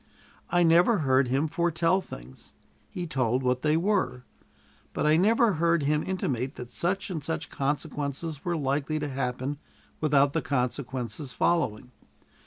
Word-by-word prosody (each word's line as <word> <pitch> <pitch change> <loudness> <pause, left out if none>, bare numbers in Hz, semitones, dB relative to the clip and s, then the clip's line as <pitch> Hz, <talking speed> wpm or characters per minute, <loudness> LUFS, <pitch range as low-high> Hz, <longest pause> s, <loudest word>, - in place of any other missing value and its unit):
I 175 0 +3
never 175 +7 +5
heard 130 0 +4
him 135 +5 +1
foretell 170 +3 +1
things; - - -12 0.3
he 180 - -5
told 130 -5 0
what 125 0 +1
they 155 +1 +2
were, 170 -9 0 0.7
but - - -1
I 155 +1 +5
never 220 +5 +4
heard 170 -1 +2
him 150 +2 +2
intimate 135 -8 -2
that 125 -1 -8
such 185 +8 -2
and 160 -5 -4
such 160 +1 -3
consequences 145 +1 -3
were 175 -1 -1
likely 145 +2 -1
to 150 -1 -2
happen 130 +1 -3 0.4
without 145 -2 +3
the - - +1
consequences 130 0 -3
following. 125 -9 0
150 Hz, 145 wpm, -27 LUFS, 130-170 Hz, 0.7 s, never